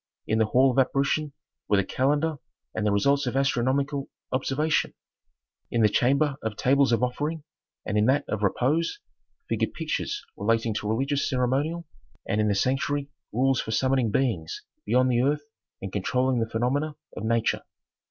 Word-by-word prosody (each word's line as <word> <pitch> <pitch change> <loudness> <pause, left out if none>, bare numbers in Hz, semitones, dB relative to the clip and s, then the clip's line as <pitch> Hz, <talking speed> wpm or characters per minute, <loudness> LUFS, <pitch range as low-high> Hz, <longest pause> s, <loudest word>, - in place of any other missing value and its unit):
In 110 - +1
the 110 - +4
hall 130 +4 +4
of 125 - +1
"apparition" 140 +3 +1 0.4
were 105 - +3
the 100 - +3
calendar 145 +7 0 0.4
and 110 -1 -1
the - - +2
results 140 +7 +2
of 125 - -2
astronomical 135 +2 0 0.2
observation; 145 +4 0 0.7
in 115 -1 +1
the 105 - +6
chamber 140 +6 +2
of 110 -1 -3
"tables 135 +3 +3
of 115 +1 +2
offering," 150 +5 -2 0.4
and 105 - 0
in 105 - +3
that 135 +3 +2
of 105 - -2
"repose" 140 - +1 0.5
figured - - -1
pictures 415 - -3
relating 115 +2 +1
to 105 0 -3
religious 135 +5 0
ceremonial, 140 +6 0 0.4
and 105 +2 +1
in 105 - +2
the 100 - +2
sanctuary 140 +6 0 0.2
rules 130 +3 +2
for - - -8
summoning 130 +1 +2
beings 100 -9 -1 0.2
beyond 125 +3 +3
the 120 0 +3
earth 145 +3 +1 0.4
and 95 - -5
controlling 125 +5 +1
the 115 0 -1
phenomena 140 +7 0 0.2
of - - -6
nature. 115 0 +1
130 Hz, 160 wpm, -26 LUFS, 110-140 Hz, 0.7 s, the